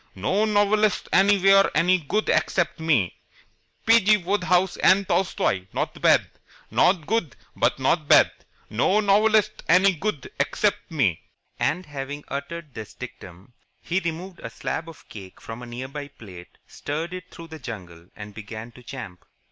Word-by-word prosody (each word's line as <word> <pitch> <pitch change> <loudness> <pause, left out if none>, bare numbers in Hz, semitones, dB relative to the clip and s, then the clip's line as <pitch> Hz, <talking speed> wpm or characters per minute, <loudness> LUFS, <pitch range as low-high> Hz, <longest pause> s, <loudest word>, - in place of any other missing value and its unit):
No 190 - +1
novelists 210 0 +2
anywhere 195 0 +5
any 180 +2 +3
good 205 +8 -2
except 175 -2 +1
me. 145 - +1 0.7
P. 225 +1 +7
G. 210 +2 +5
Wodehouse 185 -1 +1
and 195 +1 +4
Tolstoi 95 - 0
not - - -3
bad. - - +4 0.4
Not 175 -3 +3
good, 210 -6 -1 0.2
but - - +1
not 145 +3 +1
bad. - - +6 0.4
No 125 - +2
novelists 215 +1 +3
any 190 +3 +5
good 160 -4 -4
except 200 +8 0
me." 125 - 0 0.4
And, 160 +7 0
having 145 0 -6
uttered 150 +1 -6
this 110 -2 -9
dictum, 110 -4 -11 0.3
he 175 +2 -1
removed 175 +2 -5
a 115 - -7
slab 160 +7 -5
of 165 - -15
cake 95 -3 -11
from 115 +1 -9
a 120 - -9
near 120 +2 -6
by 145 +1 -7
plate, 95 -10 -13
steered 160 +4 -5
it 185 0 -8
through 165 -1 -12
the 160 -1 -9
jungle, 90 - -9
and 105 0 -9
began 110 +2 -8
to 125 - -16
champ. 120 -8 -9
160 Hz, 155 wpm, -24 LUFS, 120-190 Hz, 0.7 s, P